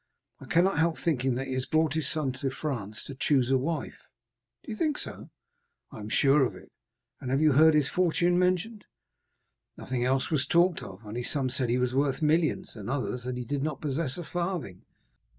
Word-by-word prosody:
I - - -11
cannot 175 -1 +2
help 165 0 +2
thinking 135 -6 0
that 130 +2 -3
he 130 - -4
has 130 0 -2
brought 155 -2 +2
his 160 -3 0
son 150 -4 -1
to 135 +1 -3
France 120 -7 -5
to 140 - -8
choose 130 -1 +1
a 135 - +5
wife." 160 +4 -4 0.6
"Do 245 - -8
you - - -3
think 300 +5 0
so?" - - -6 0.6
"I - - -9
am 105 0 -7
sure 140 +4 +4
of 125 - -1
it." - - -15 0.5
"And 130 +1 -1
you 155 -1 +4
have 140 - +3
heard 160 0 +7
his 150 -3 +3
fortune 175 +1 +2
mentioned?" 185 +4 0 0.9
"Nothing 125 -2 -3
else 130 +3 0
was 145 -3 +1
talked 175 +1 +3
of; 95 +3 -10
only 110 +4 -4
some 130 -1 0
said 130 -2 0
he 120 - +2
was 125 0 0
worth 135 0 +1
millions, 155 -1 +1
and 105 -1 -7
others 125 -2 -2
that 125 0 -3
he 125 - -4
did 140 +3 -2
not 150 -1 -2
possess 145 -1 -1
a 175 - -5
farthing." 170 - -4
140 Hz, 205 wpm, -28 LUFS, 130-160 Hz, 0.9 s, heard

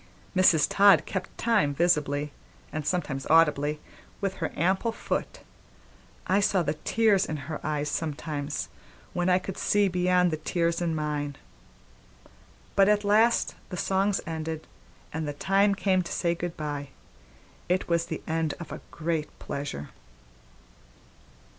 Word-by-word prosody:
Mrs. 180 -4 +5
Todd 195 -6 +6
kept 190 -1 -5
time 210 -12 +2
visibly, 150 -3 +1 0.4
and 155 -1 -3
sometimes 150 -6 -2
audibly, 150 -2 +4 0.4
with 195 -2 -2
her 160 - -2
ample 190 +8 +1
foot. 225 - -4 0.8
I 190 +2 +3
saw 195 -3 +2
the 150 -1 0
tears 200 +5 +2
in 155 - -3
her 155 - -5
eyes 150 -1 -1
sometimes, 150 -2 -3 0.4
when 175 0 0
I 180 - +5
could 190 0 -5
see 205 -1 +3
beyond 180 0 +2
the 155 - -1
tears 170 +2 0
in 165 -2 0
mine. 150 -2 -2 1.4
But 195 0 +5
at 210 0 +3
last 220 +3 +3 0.2
the 180 - -5
songs 195 +2 +1
ended 160 -1 -4 0.5
and 160 0 -3
the 145 - -3
time 195 +6 +2
came 190 -2 +2
to 170 - -7
say 170 -1 +1
good 170 0 -5
by; 145 -2 -4 0.8
it 180 +1 +1
was 170 -1 +1
the 160 - -5
end 160 -1 -1
of 170 -4 -8
a 155 - -7
great 160 -2 -3
pleasure. 140 - -5
170 Hz, 140 wpm, -27 LUFS, 150-190 Hz, 1.4 s, Todd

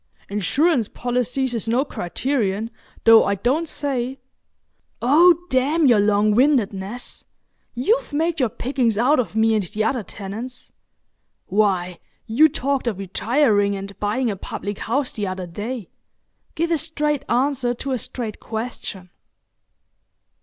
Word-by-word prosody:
"Insurance 235 - +1
policies 250 +1 -1
is 230 -1 -3
no 245 +5 +2
criterion, 220 - -2 0.3
though 225 0 +8
I 200 - +1
don't 270 - 0
say——" 265 -2 -2 0.8
"Oh, 335 +7 +5
damn 285 +5 +2
your 240 -5 +5
longwindedness! 210 +1 +1 0.5
You've 440 - +1
made 325 +2 0
your 250 -4 +2
pickings 245 -1 -1
out 255 +6 +3
of 230 -3 -2
me 225 0 +3
and 215 - +2
the 215 +5 -2
other 235 +2 0
tenants. 215 +6 -8 0.7
Why, 185 -4 0 0.3
you 270 +8 +5
talked 275 -3 -1
of 215 -5 -1
retiring 205 +1 +1
and 195 0 -7
buying 220 +3 0
a - - -4
public 200 +1 -6
house 265 +3 -1
the 205 -2 -3
other 185 0 -4
day. 210 +4 -5 0.7
Give 335 +2 -1
a 330 - +2
straight 300 -3 -1
answer 250 0 +1
to 270 +3 -5
a 255 - 0
straight 225 -1 -5
question." 220 -5 -6
240 Hz, 130 wpm, -22 LUFS, 205-275 Hz, 0.8 s, though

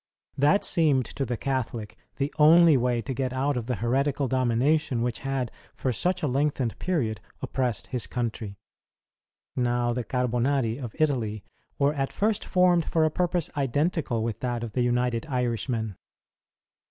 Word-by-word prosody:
That 150 +9 +3
seemed 150 - +3
to 135 - -4
the 120 - -2
Catholic 120 -5 -3 0.2
the 140 +1 -1
only 165 +1 +7
way 120 -2 +1
to 135 - -3
get 130 0 -2
out 135 +2 0
of 120 -2 -3
the 125 - 0
heretical 135 +6 0
domination 130 +1 +1
which 120 -2 -2
had 135 -3 -2 0.2
for 130 - -1
such 180 +8 0
a - - +2
lengthened 135 -3 0
period 130 -12 -1 0.2
oppressed 125 -4 -1
his 120 -7 -2
country. 110 -3 -4 1.0
Now, 120 -1 +1
the 125 0 -2
Carbonari 125 0 0
of 120 -5 -7
Italy 120 - 0 0.3
were 140 +1 +2
at 135 -2 -2
first 215 0 0
formed 180 -2 +3
for 160 -1 +2
a 155 - +1
purpose 175 0 0
identical 145 -3 0
with 115 -2 -3
that 120 -2 -2
of 115 - -5
the 125 - 0
United 125 +1 0
Irishmen. 120 -4 -1
130 Hz, 155 wpm, -26 LUFS, 120-145 Hz, 1.0 s, only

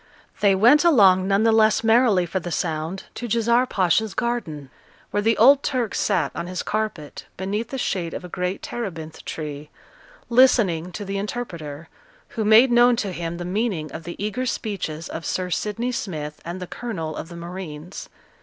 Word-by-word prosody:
They 200 -2 +4
went 240 - +6
along 195 - +5
none 200 +2 +2
the 225 - +4
less 220 0 +4
merrily 225 -5 +4
for 190 +3 -2
the 175 - -6
sound 160 +3 -2
to 240 - -5
Djezzar 235 +3 +2
Pacha's 195 +1 +1
garden, 160 - -3 0.4
where 205 - 0
the 225 +2 +2
old 270 +5 +7
Turk 250 -7 -1
sate - - 0
on 170 - -5
his 180 -1 -4
carpet, 210 -9 -4
beneath 205 +4 -2
the 270 - -4
shade 175 -8 -2
of - - -6
a - - -6
great 180 +1 -3
terebinth 165 -9 -6
tree, 150 -1 -6 0.6
listening 215 -9 +3
to 205 - -5
the 195 0 -3
interpreter, 170 -9 -6 0.4
who 220 - -3
made 220 +4 +6
known 240 0 +5
to 205 -4 -2
him 170 -1 -4
the 175 - -5
meaning 180 - -2
of 160 +3 -7
the 170 +1 -7
eager 215 +5 -2
speeches 175 -9 -4
of 165 - -6
Sir 180 +1 -2
Sidney 220 +7 -2
Smith 155 -10 -5
and 175 +2 -6
the 180 - -5
colonel 170 -7 -5
of 165 - -7
the 170 - -9
marines. 170 -1 -8
195 Hz, 180 wpm, -23 LUFS, 170-230 Hz, 0.6 s, old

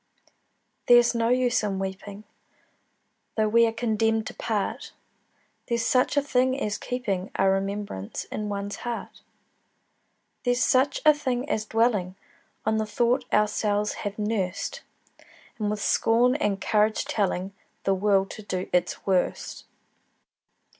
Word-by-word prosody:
There's 240 0 +6
no 230 -1 +1
use 250 -1 +2
in 200 -3 -2
weeping, 195 +2 -6 1.1
Though 215 -1 +3
we 230 +2 +5
are - - 0
condemned 225 -1 0
to - - -6
part: 215 -3 -3 0.7
There's 235 -1 0
such 255 +4 +2
a 285 - +4
thing 260 -1 +1
as 210 -5 -2
keeping 210 -7 -3
A 195 - +2
remembrance 195 - -2
in 210 -1 -5
one's 200 0 -4
heart: 240 -1 -6 1.2
There's 245 0 +2
such 265 +1 +2
a 305 - +8
thing 260 -3 -2
as 215 -7 -1
dwelling 215 -5 +1 0.5
On 220 0 +2
the 220 0 -1
thought 245 +4 0
ourselves 210 0 +1
have 205 0 -4
nursed, 210 -4 -2 0.8
And 210 -1 0
with 210 0 -3
scorn 235 +2 +3
and 205 -8 0
courage 215 +1 +1
telling 195 -2 -1 0.3
The 195 - +2
world 195 0 +2
to - - -8
do 185 -3 -4
its 180 0 0
worst. 185 -2 -1
215 Hz, 135 wpm, -26 LUFS, 200-240 Hz, 1.2 s, a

